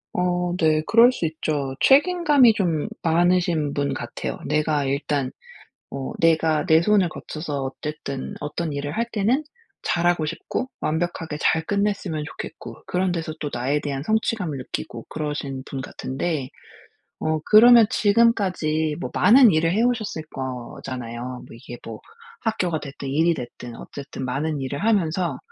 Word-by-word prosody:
어 180 -1 0
네. 155 -1 +3
그럴 235 +2 +6
수 175 - -3
있죠. 150 -4 -2
책임감이 290 -5 +5
좀 175 -3 0
많으신 170 -3 +2
분 140 0 -1
같아요. - - -5
내가 150 -2 +1
일단 140 -1 -1 0.6
어 135 +7 -5
내가 160 -2 +3
내 160 0 +5
손을 195 -2 +3
거쳐서 150 -3 -5
어쨌든 140 0 -5
어떤 150 +2 -3
일을 145 +1 -3
할 230 +1 0
때는 230 +8 +1 0.4
잘하고 175 -2 +1
싶고 170 +10 -3
완벽하게 160 -1 -2
잘 160 +1 +2
끝냈으면 200 -6 -1
좋겠고 - - -8
그런 180 0 0
데서 165 -2 -3
또 145 - -3
나에 135 +5 0
대한 140 -2 -3
성취감을 215 -5 -1
느끼고 120 -2 -6
그러신 145 -3 -4
분 135 -1 -5
같은데. 135 +1 -3 0.7
어 155 0 0
그러면 230 +1 +8
지금까지 185 -9 +2
뭐 - - -4
많은 235 +5 +7
일을 165 -1 +2
해 220 +5 +2
오셨을 220 -8 -1
거잖아요. 125 -1 -6
뭐 - - -12
이게 120 +1 -10
뭐 110 -1 -8 0.4
학교가 180 -8 -1
됐든 140 -1 -7
일이 165 +4 +2
됐든 120 -2 -8
어쨌든 140 -2 -8
많은 145 +3 -2
일을 140 +5 -4
하면서 180 - +1
160 Hz, 295 characters per minute, -23 LUFS, 140-190 Hz, 0.7 s, 그러면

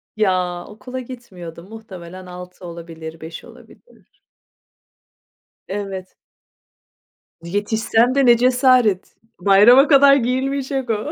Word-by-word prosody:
Ya, 180 -4 -1
okula 250 +5 -8
gitmiyordum. 190 -8 -11
Muhtemelen 185 -5 -11
6 180 0 -11
olabilir, 165 -1 -10
5 160 +1 -9
olabilir. 485 - -20 1.5
Evet. 195 -2 -6 1.3
Yetişsem 220 +6 0
de 275 - +3
ne 240 -1 +6
cesaret, 250 -5 +2 0.2
bayrama 210 +9 +6
kadar 280 -1 +6
giyilmeyecek 265 +1 -2
o. 225 +6 -2
210 Hz, 90 wpm, -19 LUFS, 180-255 Hz, 1.5 s, ne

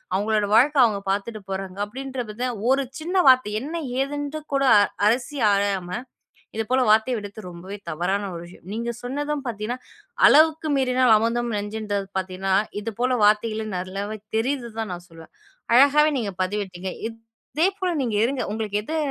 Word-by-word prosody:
அவுங்களோட 210 +1 +1
வாழ்க்கை 280 +5 +5
அவுங்க 205 -3 -1
பாத்துட்டு 210 +2 -3
போறாங்க, 190 0 -5
அப்பிடின்ற 260 +3 -5
வித 245 +4 -2 0.2
ஒரு 270 0 +2 0.2
சின்ன 350 +4 -4
வார்த்தை 255 -5 +4
என்னை 330 +4 -4 0.2
ஏதுன்ற 290 +2 -3
கூட 275 - +2 0.4
அலசி 250 +6 0
ஆராயாம, 200 -3 0 0.7
இதுபோல 225 +4 +1
வார்த்தை 220 +4 +4
விடுத்து 205 0 -7
ரொம்பவே 180 +3 -8
தவறான 180 +5 -1
ஒரு 170 - -6
விஷயம். 175 0 -15
நீங்கச் 235 +2 -4
சொன்னதும் 290 +3 -3
பார்த்தீங்கன்னா, 230 +1 -3 0.5
"அளவுக்கு 315 +1 +5
மீறினால் 255 -2 +3
அமிர்தமும் 230 +1 0
நஞ்சுன்றது" 205 -1 -3
பார்த்தீங்கன்னா 190 0 -1 0.3
இதுபோல 235 +4 -1
வார்த்தைகள் 215 +1 +2
நல்லாவே 195 +4 -4 0.2
தெரியுது 250 +1 -1
தான் 220 -3 -3
நான் 175 0 -7
சொல்லுவேன். 165 -1 -14 0.4
அழகாக 285 +4 +6
நீங்கப் 205 -7 -3
பதிவிட்டீங்க, 190 -1 -3 0.2
இதேபோல 300 - -3
நீங்க 235 -4 -2
இருங்க. 260 +1 -1
உங்களுக்கு 210 -1 -2
எது 315 +9 -4
225 Hz, 140 wpm, -24 LUFS, 200-260 Hz, 0.7 s, அழகாக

